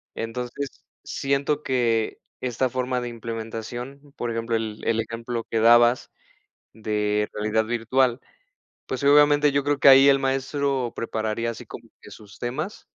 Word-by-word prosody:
Entonces 125 +4 -5 0.2
siento 140 +2 -1
que 115 -4 0 0.2
esta 130 +1 -1
forma 125 0 -2
de 120 - -4
implementación, 115 +4 -7
por 120 - -3
ejemplo, 115 0 -2
el 110 -1 -3
el 115 -1 +1
ejemplo 115 +1 -4
que 115 - 0
dabas 120 +2 +5 0.6
de 105 -1 -1
realidad 110 +1 0
virtual, 120 +2 +1 0.7
pues, 130 0 -4
obviamente, 145 0 +5
yo 140 0 +1
creo 145 0 0
que - - +4
ahí 135 +1 +9
el 135 0 +4
maestro 135 -1 -1
prepararía 110 0 -2
así 115 - -10
como - - -11
que - - -14
sus 105 -3 -14
temas. 150 - -4
120 Hz, 145 wpm, -24 LUFS, 115-135 Hz, 0.7 s, ahí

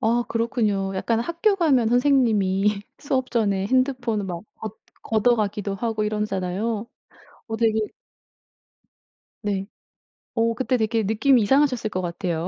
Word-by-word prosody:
아, 235 +2 +2
그렇군요. 215 -4 0
약간 225 +4 0
학교 340 - +1
가면 275 - +3
선생님이 210 -6 +2 0.2
수업 260 -3 -1
전에 200 -4 +1
핸드폰을 255 -3 +1
막 175 -2 -5 0.2
걷 220 0 -6 0.5
걷어가기도 210 -4 +1
하고 220 +1 -2
이러잖아요. 210 +1 -2 0.6
어 225 -1 -3
되게 220 -1 +2 1.6
네. 200 -2 -2 0.7
어 230 0 +2
그때 255 +1 0
되게 220 0 0
느낌이 225 +5 +3
이상하셨을 255 0 +2
것 185 -2 -2
같아요. 175 -1 -3
220 Hz, 280 characters per minute, -23 LUFS, 200-245 Hz, 1.6 s, 가면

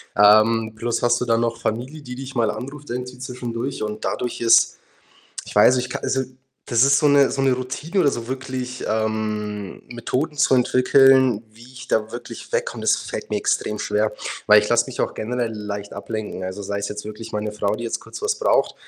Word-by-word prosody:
Ähm, 110 +2 +5
plus 115 +1 -1
hast 120 0 +3
du 125 - -1
dann 115 0 +2
noch 115 0 -1
Familie, 125 +8 -3
die 125 -2 -8
dich 135 +1 -7
mal 115 -3 +2
anruft 140 +6 -8
irgendwie 125 0 -5
zwischendurch 125 0 -4
und 105 0 -4
dadurch 125 - -2
ist 115 0 +5 0.7
ich - - -9
weiß, 115 +5 +6
ich 125 0 -2
ka - - -4
also, 130 0 0 0.5
das 120 0 +3
ist 140 +1 +5
so 150 - +3
'ne 140 -1 +5
so 135 - -2
'ne 135 -1 +4
Routine 130 +9 -2
oder 140 - +4
so 115 -1 -5
wirklich, 130 -1 -5
ähm, 105 -2 -2
Methoden 125 +5 -3
zu 145 -3 +4
entwickeln, 130 -2 +4
wie 115 +2 -17
ich 125 +1 -12
da 110 0 0
wirklich - - -9
wegkomme, - - -1
das - - +3
fällt - - -6
mir - - 0
extrem 105 0 -1
schwer, 105 +1 0 0.4
weil 105 0 +8
ich 105 - -3
lass 120 +2 +3
mich 125 - -5
auch - - -1
generell 120 0 -2
leicht 105 -1 -6
ablenken. 105 -1 -5
Also, 95 +2 -5
sei 100 +1 -3
es 100 - -3
jetzt 105 0 -6
wirklich 110 +1 -8
meine 105 0 -3
Frau, 105 0 -1
die 120 - -6
jetzt 115 - -3
kurz - - -10
was 430 0 +1
braucht, - - +2
120 Hz, 205 wpm, -22 LUFS, 110-130 Hz, 0.7 s, weil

